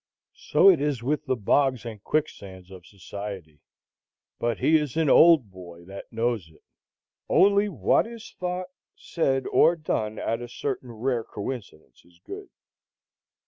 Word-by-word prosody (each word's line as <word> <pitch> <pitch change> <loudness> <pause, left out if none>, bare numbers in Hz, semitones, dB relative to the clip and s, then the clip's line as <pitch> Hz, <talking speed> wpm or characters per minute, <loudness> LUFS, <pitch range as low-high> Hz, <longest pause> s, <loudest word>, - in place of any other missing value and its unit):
So - - +5
it 170 - 0
is 145 -5 -1
with 150 +3 -2
the 130 - +1
bogs 130 +3 +1
and 110 -3 -8
quicksands 95 - -3
of 90 -2 -12
society; 100 -5 -9 0.8
but 120 -1 -1
he 160 - +3
is 150 -1 -3
an 160 -4 +3
old 155 - +6
boy 85 -2 -12
that 95 +2 -10
knows 115 -6 -2
it. 80 - -23 0.7
Only 200 +1 +4
what 135 - +1
is 230 -1 -11
thought, 180 0 -3 0.3
said, 135 -6 -1
or 170 - +5
done 110 -9 -3
at 115 +1 -2
a 120 - -7
certain 130 -1 -4
rare 115 +1 -2
coincidence 105 -7 -8
is 85 0 -25
good. - - -9
120 Hz, 145 wpm, -25 LUFS, 100-150 Hz, 0.8 s, old